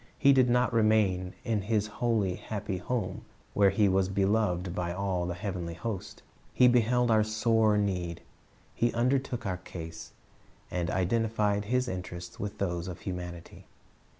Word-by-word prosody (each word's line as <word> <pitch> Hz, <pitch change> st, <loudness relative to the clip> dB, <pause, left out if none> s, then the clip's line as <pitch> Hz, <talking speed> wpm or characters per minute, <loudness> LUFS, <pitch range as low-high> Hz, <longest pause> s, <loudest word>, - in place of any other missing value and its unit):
He 140 Hz, -1 st, +6 dB
did 130 Hz, -2 st, +4 dB
not 125 Hz, 0 st, +2 dB
remain 105 Hz, -5 st, +2 dB
in 110 Hz, -3 st, 0 dB
His 105 Hz, +1 st, 0 dB
holy, 105 Hz, -3 st, 0 dB
happy 100 Hz, -3 st, -4 dB
home, 120 Hz, +4 st, -3 dB, 0.3 s
where 100 Hz, -1 st, +5 dB
He 100 Hz, +2 st, +3 dB
was 95 Hz, 0 st, +2 dB
beloved 95 Hz, -2 st, +1 dB
by 90 Hz, -1 st, -2 dB
all 90 Hz, -1 st, -1 dB
the 90 Hz, -, -3 dB
heavenly 90 Hz, -3 st, -4 dB
host. 95 Hz, +2 st, -6 dB, 0.3 s
He 125 Hz, -, +6 dB
beheld 120 Hz, 0 st, +3 dB
our 110 Hz, -1 st, +5 dB
sore 110 Hz, 0 st, +2 dB
need, 90 Hz, -5 st, -1 dB, 0.6 s
lie 120 Hz, -, +4 dB
undertook 125 Hz, 0 st, 0 dB
our 95 Hz, -2 st, -1 dB
case, 80 Hz, -2 st, -9 dB, 0.6 s
and 90 Hz, -1 st, -1 dB
identified 105 Hz, +1 st, +1 dB
His 125 Hz, +3 st, +1 dB
interests 90 Hz, -3 st, -6 dB
with 105 Hz, +1 st, -4 dB
those 85 Hz, -3 st, -2 dB
of 90 Hz, -1 st, -7 dB
humanity. 90 Hz, -2 st, -7 dB
100 Hz, 150 wpm, -29 LUFS, 90-115 Hz, 0.6 s, He